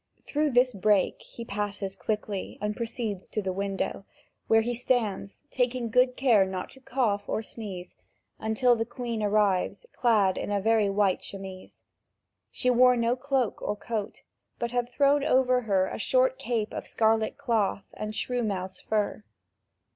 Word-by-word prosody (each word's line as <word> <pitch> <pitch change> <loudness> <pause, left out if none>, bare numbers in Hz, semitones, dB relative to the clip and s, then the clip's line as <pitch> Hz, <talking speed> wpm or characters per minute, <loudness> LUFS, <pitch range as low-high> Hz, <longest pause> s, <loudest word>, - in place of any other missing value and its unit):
Through 300 +1 0
this 250 0 +3
break 200 -1 +2
he 235 - -10
passes 200 -2 -3
quickly 205 +1 -3
and 210 0 -2
proceeds 230 -5 -4
to - - -2
the 190 -3 -2
window, 195 0 -2 0.4
where 225 0 +5
he 240 +2 -1
stands, 225 -4 -1
taking 245 -2 0
good 250 +1 +3
care 235 -7 +5
not 190 -1 -4
to 265 - -14
cough 235 -6 -1
or 220 - -1
sneeze, 195 -5 -8 0.4
until 220 +3 +3
the 225 - 0
Queen 235 -1 -4
arrives 205 - +1
clad 210 -6 +3
in - - -4
a 205 -1 +1
very 220 0 +3
white 195 -1 +2
chemise. 190 -1 -9 0.7
She 250 - +1
wore 250 0 +5
no 235 +1 +2
cloak 260 -3 -1
or 210 - -2
coat, 215 -1 -5 0.3
but 235 0 -3
had 245 -1 -1
thrown 280 +2 +3
over 255 -3 +3
her 190 -2 +3
a - - -5
short - - +2
cape 225 -3 -2
of - - -5
scarlet 220 0 +1
cloth 205 -4 0
and 215 0 -5
shrew 245 +2 -1
mouse 190 -4 -3
fur. 215 0 -1
220 Hz, 160 wpm, -28 LUFS, 200-245 Hz, 0.7 s, where